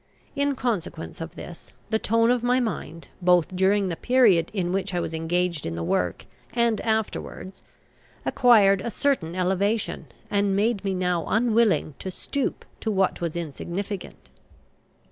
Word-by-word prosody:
In 280 0 +1
consequence 205 -11 -3
of 165 - -7
this, 175 - -10 0.2
the 220 - +2
tone 230 +2 +3
of 245 -1 +1
my 245 +1 +2
mind, 210 -8 -4
both 180 0 +3
during 195 +2 +3
the 175 - -2
period 215 -8 +4
in 180 -4 -1
which 190 -1 -1
I - - +1
was 165 - -3
engaged 170 0 -1
in 85 - -3
the 85 - -3
work 90 +1 -1 0.3
and 235 -3 +2
afterwards, 220 -3 -3 0.6
acquired 205 -6 +5
a 235 - -3
certain 230 - 0
elevation, 190 -1 0 0.2
and 200 -1 +2
made 210 0 +1
me 195 -1 -1
now 180 -2 0
unwilling 220 -9 +2
to 190 - -5
stoop 275 +8 -3
to 220 - -2
what 190 -4 +1
was 170 -2 -2
insignificant. 170 +5 -5
195 Hz, 150 wpm, -25 LUFS, 175-225 Hz, 0.6 s, acquired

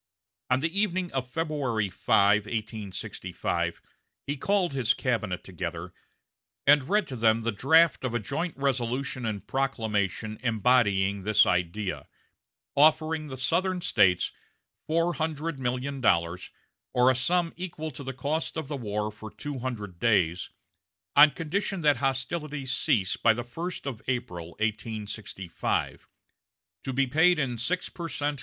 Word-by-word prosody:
On 130 +1 +2
the 165 +5 -1
evening 185 -3 0
of 130 -2 -3
February 140 -9 -1
5, 100 +2 +3
1865, 110 -4 -3 0.5
he 145 - -2
called 185 +2 +1
his 125 -3 +2
cabinet 105 -8 -1
together, 85 -1 -5 0.7
and 145 0 +5
read 210 -2 +2
to 130 - -6
them 115 -1 +3
the 115 +1 0
draft 160 +10 +4
of 125 -2 -2
a - - +2
joint 150 - -3
resolution 130 -1 -1
and 105 -3 -4
proclamation 110 -5 -1
embodying 105 -4 +2
this 105 +2 +5
idea, 90 +3 -1 0.7
offering 155 +1 +3
the 130 -2 -7
Southern 180 +8 +1
States 90 - +3 0.6
four 165 +2 +2
hundred 160 -2 -3
million 130 +2 -2
dollars, 85 -4 +1 0.5
or 125 +1 +6
a - - 0
sum 170 +7 +1
equal 160 -3 -5
to 135 +1 -8
the 135 - -4
cost 145 +6 -2
of 160 -3 -3
the 145 -1 -3
war 105 -3 -2
for 110 +1 -10
two 145 +4 -6
hundred 105 -8 -5
days, 90 -6 +2 0.7
on 150 +1 +9
condition 175 +5 -2
that 145 -3 +4
hostilities 135 +1 -2
cease 115 -9 +1
by 115 -1 +4
the 120 - -3
first 165 +10 -6
of 130 -6 -5
April, 90 -10 -3
1865; 105 -3 -3 0.8
to 135 - -3
be 135 +1 +2
paid 160 +7 +4
in 125 -6 -1
six 180 +10 -1
per 170 -2 -6
cent. 145 -1 -2
130 Hz, 140 wpm, -27 LUFS, 110-150 Hz, 0.8 s, on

